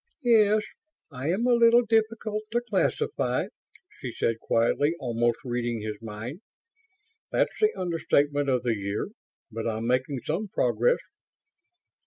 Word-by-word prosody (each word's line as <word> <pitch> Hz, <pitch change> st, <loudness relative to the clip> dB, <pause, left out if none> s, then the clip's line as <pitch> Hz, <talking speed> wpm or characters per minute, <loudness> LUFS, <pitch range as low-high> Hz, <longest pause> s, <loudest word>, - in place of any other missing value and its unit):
"Yes, 215 Hz, -3 st, +5 dB, 0.5 s
I 135 Hz, +3 st, -4 dB
am 195 Hz, +8 st, +1 dB
a 250 Hz, -, +4 dB
little 235 Hz, 0 st, +6 dB
difficult 220 Hz, -1 st, 0 dB
to 240 Hz, -, +2 dB
classify," 435 Hz, -, 0 dB, 0.5 s
she 125 Hz, -, -5 dB
said 115 Hz, -1 st, 0 dB
quietly, 145 Hz, +9 st, +1 dB
almost 120 Hz, -2 st, 0 dB
reading 120 Hz, -2 st, -2 dB
his 105 Hz, 0 st, -5 dB
mind. 115 Hz, -, -7 dB, 0.9 s
"That's -, -, +1 dB
the 430 Hz, 0 st, +4 dB
understatement 145 Hz, -5 st, +1 dB
of 125 Hz, -2 st, +1 dB
the 120 Hz, -2 st, +1 dB
year! 100 Hz, -, -3 dB, 0.4 s
But 115 Hz, +1 st, -4 dB
I'm 110 Hz, 0 st, -2 dB
making 125 Hz, +2 st, 0 dB
some 185 Hz, +8 st, -2 dB
progress." 485 Hz, -, +2 dB
145 Hz, 130 wpm, -27 LUFS, -, 0.9 s, little